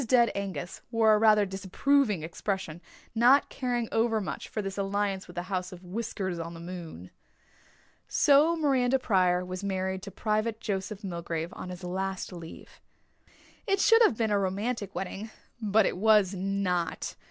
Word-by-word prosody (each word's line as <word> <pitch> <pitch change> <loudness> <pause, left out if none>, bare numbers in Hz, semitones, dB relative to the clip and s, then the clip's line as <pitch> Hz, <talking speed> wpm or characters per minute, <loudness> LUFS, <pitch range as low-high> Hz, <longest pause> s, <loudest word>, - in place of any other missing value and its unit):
Dead 235 -2 +4
Angus 185 -5 -5
wore 225 -2 +4
a 210 - +4
rather 215 -1 +5
disapproving 195 - +1
expression, 175 0 -4 0.3
not 245 +5 +5
caring 245 -3 -2
over 225 0 +2
much 200 - -5
for - - -4
this 195 -2 -3
alliance 200 -1 -1
with - - -12
the 175 - -3
house 185 -1 -3
of 180 0 -11
Whiskers 190 -2 -4
on 165 +1 -6
the - - -9
moon. 170 - -8 1.0
So 295 +4 +4
Miranda 270 -5 +2
Pryor 180 -6 +2
was 185 +1 -6
married 190 -1 -2
to 200 - -7
Private 215 +3 -1
Joseph 205 -1 -4
Milgrave 170 -2 -4
on 180 - -7
his 180 0 -8
last 190 +1 -3
leave. 165 -2 -11 0.9
It 395 -1 +2
should 455 +3 +6
have 345 - +5
been 220 -2 0
a 205 - +3
romantic 200 +2 -2
wedding 195 +3 -5 0.3
but 215 0 +3
it - - -1
was 210 -1 +4
not. 185 -3 -2
195 Hz, 160 wpm, -28 LUFS, 180-225 Hz, 1.0 s, should